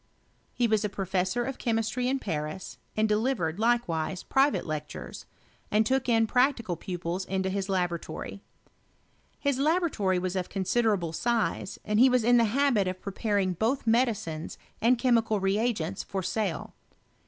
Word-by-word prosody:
Hewas 220 -3 +3
a 210 - 0
professor 190 +4 -1
of 270 +1 -5
chemistry 230 +2 0
in 270 +1 +1
Paris, 155 - -5 0.2
and 215 0 +3
delivered, 210 -6 0
likewise, 195 -7 0
private 275 +2 +2
lectures, 150 -1 -6 0.4
and 215 +1 +3
took 260 +2 +1
in 225 -1 +4
prac 255 +4 +3
tical 205 -8 -4
pupils 180 -1 -3
into 190 0 -1
his 195 0 -2
laboratory. 180 +1 -3 1.0
His 280 -2 0
laboratory 295 - +1
was 185 +1 -2
of 185 -1 -2
considerable 195 -3 0
size, 230 0 -1
and 210 0 +1
he 260 +2 +7
was 250 -2 +3
in 245 +2 +5
the 235 - +5
habit 235 -3 +2
of 185 0 -3
pre 200 +1 -6
paring 200 -3 0
both 230 - 0
medicines 220 -9 0 0.2
and 240 +3 +4
chemical 230 -4 +2
reagents 195 -2 0
for 190 -2 -4
sale. 195 -5 -2
215 Hz, 150 wpm, -28 LUFS, 185-240 Hz, 1.0 s, he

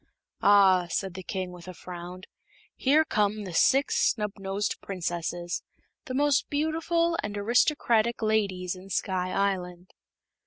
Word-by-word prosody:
"Ah," 190 -3 +5
said 190 +1 -2
the 190 - -7
King, 185 0 -4
with 180 0 -12
a 185 - -8
frown, 180 +1 -9 0.5
"here 300 +4 +3
come 210 -4 0
the 185 -3 -7
Six 270 - +3 0.2
Snubnosed 200 -2 -3
Princesses 175 -2 -3 0.4
the 255 - -5
most 290 0 +2
beautiful 330 +3 0
and 205 -1 -5
aristocratic 235 0 +2
ladies 195 -4 0
in 185 +1 -12
Sky 185 -1 -1
Island." 185 -2 -2
195 Hz, 125 wpm, -27 LUFS, 180-235 Hz, 0.5 s, Ah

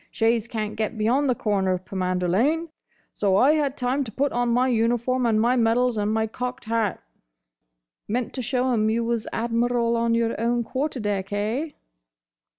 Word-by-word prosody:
Shays 225 0 +1
can't 215 -3 -4
get 220 +1 -2
beyond 255 +6 +2
the 250 - +2
corner 195 -4 0
of 185 0 -5
Pomander 185 -1 -1
Lane; 295 - +1 0.4
so 195 -2 +1
I 265 +7 +5
had 290 -3 0
time 255 +3 0
to 220 - -7
put 280 +6 0
on 245 0 0
my 250 +2 +2
uniform, 240 +1 +1
and 220 -2 +2
my 240 +3 +3
medals, 240 +1 +2
and 210 0 0
my 220 0 +1
cocked 250 +3 -5
hat—" 225 -2 -1 1.0
"Meant 240 +2 -2
to 260 - -3
show 255 +2 0
'em 215 -2 +2
you 230 +1 0
was 230 -1 -2
Admiral 235 +1 0
on 230 0 +1
your 230 -1 0
own 235 +1 +1
quarter 265 +3 -3
deck, 200 -3 -2
eh?" 225 +10 -2
235 Hz, 180 wpm, -24 LUFS, 215-250 Hz, 1.0 s, I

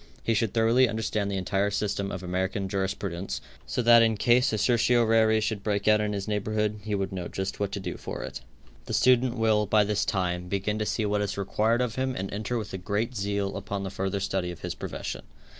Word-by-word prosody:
He 115 - +1
should 110 -1 +1
thoroughly 115 +3 +4
understand 110 -2 -1
the 100 - -2
entire 95 +2 0
system 100 -1 -2
of 95 -2 -5
American 95 +2 -1
jurisprudence, 95 -6 -3 0.3
so 125 - -1
that 115 0 +8
in 110 -1 +3
case 125 +3 +4
a 110 - 0
certiorari 115 -1 +3
should 110 -1 -1
break 100 -1 -1
out 105 0 +5
in 105 0 -1
his 100 0 -3
neighborhood 105 0 -1
he 105 -1 -1
would 95 -1 -2
know 90 -2 -4
just 95 0 -4
what 100 -1 -1
to - - -2
do 90 -2 -5
for - - -6
it. - - -6 0.5
The - - -1
student 125 -1 +4
will, 110 -2 +2
by 105 +1 +4
this 105 0 0
time, 90 -2 -1
begin 100 +3 -1
to 105 - -1
see 110 - 0
what 105 0 +1
is 100 -1 -2
required 110 +4 +1
of 125 0 -2
him 130 0 -1
and 95 +1 -4
enter 110 +4 -2
with 105 -2 -5
great 110 +6 -1
zeal 100 -1 -1
upon 100 -1 -4
the 95 - -4
further 95 0 -2
study 95 -2 -1
of 90 -1 -8
his 90 - -3
profession. - - -5
105 Hz, 220 wpm, -27 LUFS, 95-110 Hz, 0.5 s, that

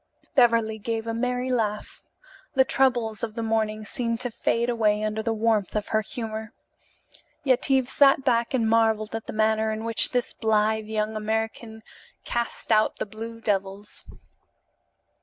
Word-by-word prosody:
Beverly 230 -5 +3
gave 225 +1 -3
a 230 - -3
merry 250 +2 -1
laugh. 215 -4 -2 0.5
The 265 0 +5
troubles 240 -6 +1
of 220 -2 -3
the 230 - -3
morning 215 -1 -1
seemed 230 +1 -2
to 245 - -3
fade 230 +1 0
away 215 -3 +1
under 215 0 -1
the 230 - -1
warmth 220 -2 0
of 210 - -2
her 215 - +2
humor. 220 0 -6 0.9
Yetive 260 -1 +3
sat 275 0 +4
back 240 0 +1
and 230 -3 +1
marvelled 220 -1 +2
at 225 -1 -5
the - - -4
manner 220 0 +1
in 215 0 -4
which 230 -1 +3
this 245 -1 -1
blithe 220 -1 +1
young 215 0 -2
American 220 +1 -3 0.4
cast 235 -1 -3
out 215 0 +3
the - - -4
"blue 225 +2 -8
devils." 200 -1 -3
225 Hz, 155 wpm, -25 LUFS, 215-235 Hz, 0.9 s, The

